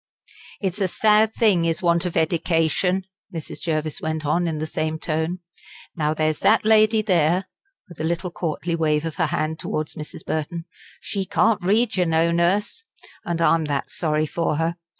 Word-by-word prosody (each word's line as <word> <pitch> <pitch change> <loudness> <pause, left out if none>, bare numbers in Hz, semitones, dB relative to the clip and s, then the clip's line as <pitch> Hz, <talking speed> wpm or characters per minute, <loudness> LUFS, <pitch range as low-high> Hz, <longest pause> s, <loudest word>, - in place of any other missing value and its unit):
"It's 195 0 -2
a 190 - +3
sad 215 +3 +3
thing 205 -8 +3
is 165 +2 -1
want 170 +1 +2
of 175 - -3
edication," 165 +3 +1 0.3
Mrs. 165 -3 -7
Jervis 155 -2 -2
went 155 -1 -3
on 170 +4 +1
in 160 -2 -2
the 155 - -2
same 155 0 -2
tone. 160 +3 -2 0.5
"Now 155 -1 0
there's 155 -1 0
that - - +3
lady 215 0 +4
there" 180 -2 +2 0.4
with 175 - -14
a - - -2
little 170 +2 -2
courtly 170 0 -2
wave 155 -1 +1
of 165 - -5
her 165 -3 +2
hand 155 0 -2
towards 155 0 -3
Mrs. 155 0 -9
Burton 165 +2 -3 0.3
"she 195 - -3
can't 215 +1 +1
read 215 +4 +2
yer 180 - +3
know, 165 0 +2
Nurse, 185 - +1 0.4
and 170 -1 -1
I'm 165 -1 +3
that 145 -2 -2
sorry 155 -2 0
for 165 0 -1
her! 165 +2 -1
170 Hz, 175 wpm, -23 LUFS, 155-185 Hz, 0.5 s, lady